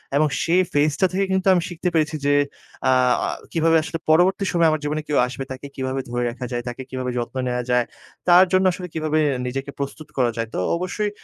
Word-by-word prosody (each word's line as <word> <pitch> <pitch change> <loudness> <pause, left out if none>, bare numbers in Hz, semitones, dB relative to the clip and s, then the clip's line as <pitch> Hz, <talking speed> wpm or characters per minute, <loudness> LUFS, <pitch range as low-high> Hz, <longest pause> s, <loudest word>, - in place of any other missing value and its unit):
এবং 155 +2 +4 0.2
সেই 175 +3 +3
phase-টা 150 +5 +2
থেকে 195 +1 +1
কিন্তু 190 0 +1
আমি 180 - +3
শিখতে 175 +1 -2
পেরেছি 155 -1 +1
যে 145 - +3 0.6
আ - - +5 0.6
কিভাবে 165 0 +3
আসলে 165 - -4
পরবর্তী 180 +5 +4
সময়ে 170 -1 +3
আমার 155 - 0
জীবনে 150 +1 -1
কেউ 150 - 0
আসবে 130 +1 -5
তাকে 130 +2 -7
কিভাবে 130 0 -2
ধরে 120 0 -1
রাখা 125 +2 -6
যায়, 120 -1 -2
তাকে 120 +2 -5
কিভাবে 130 -1 -3
যত্ন 120 +2 -4
নেওয়া 125 0 -1
যায়, 125 -1 +3 0.4
তার 180 +1 +8
জন্য 185 0 +4
আসলে 180 +1 -6
কিভাবে 155 -1 0 0.3
নিজেকে 135 +2 -4
প্রস্তুত 140 +2 -5
করা 125 -3 +2
যায়। 115 0 -1
তো - - -2 0.2
অবশ্যই 185 +4 -2
150 Hz, 205 wpm, -22 LUFS, 130-175 Hz, 0.6 s, তার